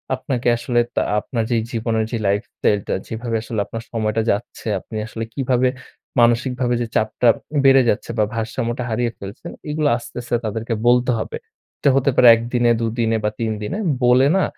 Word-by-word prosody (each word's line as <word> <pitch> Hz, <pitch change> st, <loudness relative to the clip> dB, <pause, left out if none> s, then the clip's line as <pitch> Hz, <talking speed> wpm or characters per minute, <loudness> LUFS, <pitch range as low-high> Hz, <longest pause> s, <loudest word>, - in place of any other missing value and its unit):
আপনাকে 130 Hz, -1 st, -3 dB
আসলে 120 Hz, 0 st, 0 dB, 0.2 s
তা -, -, +2 dB, 0.2 s
আপনার 115 Hz, +2 st, -3 dB
যে -, -, +3 dB, 0.2 s
জীবনের 110 Hz, -1 st, 0 dB
যে 120 Hz, -, -1 dB
lifestyle 105 Hz, 0 st, 0 dB
টা -, -, -1 dB
যেভাবে 115 Hz, +1 st, -4 dB
আসলে 110 Hz, -1 st, -4 dB
আপনার 115 Hz, 0 st, -7 dB
সময়টা 110 Hz, -1 st, 0 dB
যাচ্ছে, 105 Hz, +2 st, -4 dB
আপনি 110 Hz, -, -11 dB
আসলে 115 Hz, 0 st, -5 dB
কিভাবে 130 Hz, -1 st, +1 dB, 0.5 s
মানসিকভাবে 120 Hz, +1 st, +2 dB
যে 120 Hz, -, -1 dB
চাপটা 110 Hz, +2 st, +2 dB, 0.3 s
বেড়ে 135 Hz, -1 st, +7 dB
যাচ্ছে? 105 Hz, -, -1 dB
বা 110 Hz, -, +4 dB
ভারসাম্যটা 115 Hz, +2 st, -2 dB
হারিয়ে 120 Hz, +1 st, 0 dB
ফেলছেন? 100 Hz, +1 st, -8 dB, 0.2 s
এগুলো 150 Hz, 0 st, 0 dB
আস্তে, 120 Hz, -, -11 dB
আস্তে 120 Hz, 0 st, -2 dB
তাদেরকে 110 Hz, +2 st, -3 dB
বলতে 125 Hz, +1 st, +4 dB
হবে। -, -, -4 dB, 0.4 s
এটা -, -, +3 dB
হতে 135 Hz, 0 st, +3 dB
পারে 125 Hz, -, +6 dB
১ 115 Hz, -, -4 dB
দিনে 120 Hz, -1 st, +3 dB
২ 115 Hz, -1 st, 0 dB
দিনে 115 Hz, -1 st, +2 dB
বা 105 Hz, -, +2 dB
৩ 115 Hz, -1 st, -1 dB
দিনে, 105 Hz, -, -3 dB, 0.3 s
বলে 125 Hz, +2 st, +5 dB
না, 190 Hz, -, +3 dB
115 Hz, 180 wpm, -20 LUFS, 110-125 Hz, 0.5 s, বেড়ে